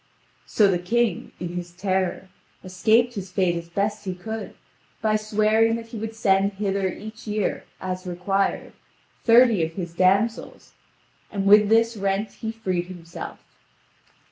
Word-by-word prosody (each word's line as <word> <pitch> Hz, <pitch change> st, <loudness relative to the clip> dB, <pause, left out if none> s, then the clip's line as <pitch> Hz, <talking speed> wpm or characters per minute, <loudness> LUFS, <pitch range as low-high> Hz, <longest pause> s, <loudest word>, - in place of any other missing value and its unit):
So 210 Hz, -, +4 dB
the 185 Hz, -3 st, +1 dB
king, 220 Hz, +1 st, 0 dB
in 175 Hz, -, -4 dB
his 175 Hz, 0 st, -6 dB
terror, 185 Hz, 0 st, -1 dB, 0.3 s
escaped 220 Hz, +6 st, +2 dB
his 195 Hz, -4 st, -6 dB
fate 185 Hz, -2 st, +1 dB
as 170 Hz, 0 st, -6 dB
best 205 Hz, +3 st, -1 dB
he 185 Hz, -1 st, -3 dB
could, 220 Hz, +4 st, -6 dB, 0.4 s
by 215 Hz, -1 st, +1 dB
swearing 215 Hz, +1 st, +2 dB
that 230 Hz, 0 st, -7 dB
he 230 Hz, -, -7 dB
would 225 Hz, +1 st, -5 dB
send 195 Hz, -2 st, +2 dB
hither 195 Hz, -1 st, -1 dB
each 220 Hz, +4 st, -10 dB
year, 210 Hz, -1 st, -1 dB
as 185 Hz, 0 st, -5 dB
required, 195 Hz, +3 st, -1 dB, 0.5 s
thirty 230 Hz, -5 st, +6 dB
of 160 Hz, 0 st, -3 dB
his 175 Hz, -2 st, -5 dB
damsels, 195 Hz, +6 st, +1 dB, 0.6 s
and 195 Hz, -1 st, -2 dB
with 205 Hz, +1 st, +6 dB
this 230 Hz, +1 st, +3 dB
rent 195 Hz, +2 st, -1 dB
he 220 Hz, -, -5 dB
freed 185 Hz, -6 st, -2 dB
himself. 170 Hz, -2 st, -8 dB
200 Hz, 145 wpm, -24 LUFS, 185-220 Hz, 0.6 s, thirty